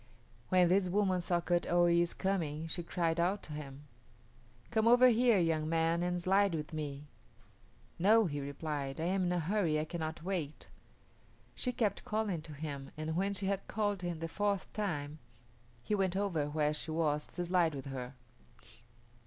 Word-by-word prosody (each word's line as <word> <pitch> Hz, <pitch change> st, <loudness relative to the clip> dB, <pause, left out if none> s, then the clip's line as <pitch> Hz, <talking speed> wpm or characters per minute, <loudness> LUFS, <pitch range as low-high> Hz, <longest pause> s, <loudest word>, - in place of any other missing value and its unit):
When 185 Hz, -2 st, +5 dB
this 185 Hz, +1 st, +3 dB
woman 190 Hz, -1 st, +2 dB
saw 175 Hz, 0 st, 0 dB
Kut 175 Hz, 0 st, 0 dB
o 175 Hz, 0 st, +3 dB
yis´ 170 Hz, 0 st, +2 dB
coming 165 Hz, -6 st, -1 dB
she 165 Hz, +2 st, -2 dB
cried 170 Hz, -1 st, -1 dB
out 190 Hz, +4 st, +1 dB
to 155 Hz, -, -8 dB
him, 145 Hz, -1 st, -8 dB, 0.9 s
"Come 220 Hz, +1 st, +2 dB
over 245 Hz, +2 st, +7 dB
here, 240 Hz, -1 st, +4 dB
young 160 Hz, -3 st, +1 dB
man, 165 Hz, +1 st, +1 dB
and 175 Hz, 0 st, 0 dB
slide 195 Hz, +1 st, +3 dB
with 150 Hz, 0 st, -5 dB
me." 145 Hz, -2 st, -5 dB, 0.9 s
"No," 215 Hz, +5 st, +5 dB
he 145 Hz, -4 st, -3 dB
replied, 140 Hz, -1 st, -4 dB
"I -, -, -1 dB
am 185 Hz, +2 st, +1 dB
in 175 Hz, -, 0 dB
a 180 Hz, -, +1 dB
hurry; 170 Hz, -2 st, +1 dB
I 155 Hz, -, -1 dB
cannot 160 Hz, -1 st, -5 dB
wait." 170 Hz, -6 st, -3 dB, 0.9 s
She 250 Hz, -, -2 dB
kept 215 Hz, -5 st, -1 dB
calling 210 Hz, -6 st, -1 dB
to 155 Hz, 0 st, -10 dB
him, 140 Hz, -2 st, -6 dB
and 155 Hz, +1 st, -3 dB
when 195 Hz, +3 st, 0 dB
she 195 Hz, -, -2 dB
had 195 Hz, 0 st, -1 dB
called 205 Hz, -3 st, -1 dB
him 175 Hz, -2 st, -4 dB
the 165 Hz, -, -2 dB
fourth 200 Hz, +2 st, -1 dB
time 155 Hz, -8 st, -3 dB, 0.6 s
he 210 Hz, -, -2 dB
went 190 Hz, -3 st, +1 dB
over 175 Hz, -8 st, 0 dB
where 150 Hz, 0 st, +1 dB
he 150 Hz, +2 st, -4 dB
was 155 Hz, -2 st, 0 dB
to 175 Hz, -, -4 dB
slide 170 Hz, -3 st, +2 dB
with 135 Hz, -, -6 dB
her. 130 Hz, -1 st, -6 dB
170 Hz, 180 wpm, -33 LUFS, 155-195 Hz, 0.9 s, over